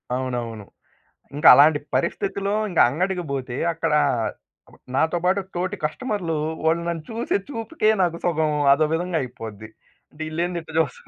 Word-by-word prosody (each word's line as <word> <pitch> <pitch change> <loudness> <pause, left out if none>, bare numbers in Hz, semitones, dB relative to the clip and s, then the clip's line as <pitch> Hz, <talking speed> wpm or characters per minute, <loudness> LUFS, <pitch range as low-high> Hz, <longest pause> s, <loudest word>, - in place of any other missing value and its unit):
అవునవును. 120 -4 -4 0.7
ఇంకా 150 +2 +3
అలాంటి 145 +3 +6 0.2
పరిస్థితిలో 200 +3 -1 0.2
ఇంకా 175 - +3
అంగడికి 180 +6 -1
బోతే 130 -2 -4 0.2
అక్కడ 165 -2 -1 1.0
నాతో 160 +5 +2
బాటు 190 +2 +2
తోటి 180 +1 -2
కస్టమర్లు 180 -1 -2 0.3
వోళ్ళు 160 +1 +2
నన్ను 165 -2 -3
చూసే 230 -1 -1
చూపుకే 225 -2 -1
నాకు 170 -2 +1
సగం 160 -3 +1 0.2
అదో 155 +3 +2
విధంగా 175 0 -1
అయిపోద్ది. 110 -4 -8 0.4
అంటే 150 - -12
యిళ్లేంది? 170 +2 -2
ఇట్లా 160 -1 -11
చూస్తున్నారు 140 -6 -6
160 Hz, 135 wpm, -23 LUFS, 140-180 Hz, 1.0 s, అలాంటి